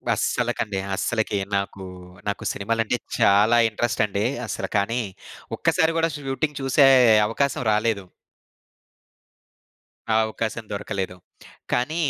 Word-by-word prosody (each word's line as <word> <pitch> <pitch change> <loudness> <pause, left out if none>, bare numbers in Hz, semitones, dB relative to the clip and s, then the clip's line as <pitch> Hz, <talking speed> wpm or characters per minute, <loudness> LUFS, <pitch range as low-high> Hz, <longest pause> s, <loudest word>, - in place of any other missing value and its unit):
అస్సలకండి. 100 -2 -1 0.2
అస్సలకి 110 +1 -1 0.2
నాకు 100 0 -3 0.4
నాకు 100 - -2
సినిమాలంటే 115 +3 -1 0.2
చాలా 105 +4 +5
ఇంట్రెస్ట్ 120 +1 0
అండి. 100 +1 -2 0.2
అసలు - - -4
కానీ 115 +5 0 0.6
ఒక్కసారి 160 0 +2
గూడా 165 0 +1
షూటింగ్ 145 +1 -3
చూసే 135 +1 +4 0.4
అవకాశం 135 +4 -1
రాలేదు. 105 -2 0 2.1
ఆ - - +3
అవకాశం 110 +1 -4
దొరకలేదు. 100 -2 -4 0.6
కానీ 145 +6 0
110 Hz, 100 wpm, -23 LUFS, 100-125 Hz, 2.1 s, చాలా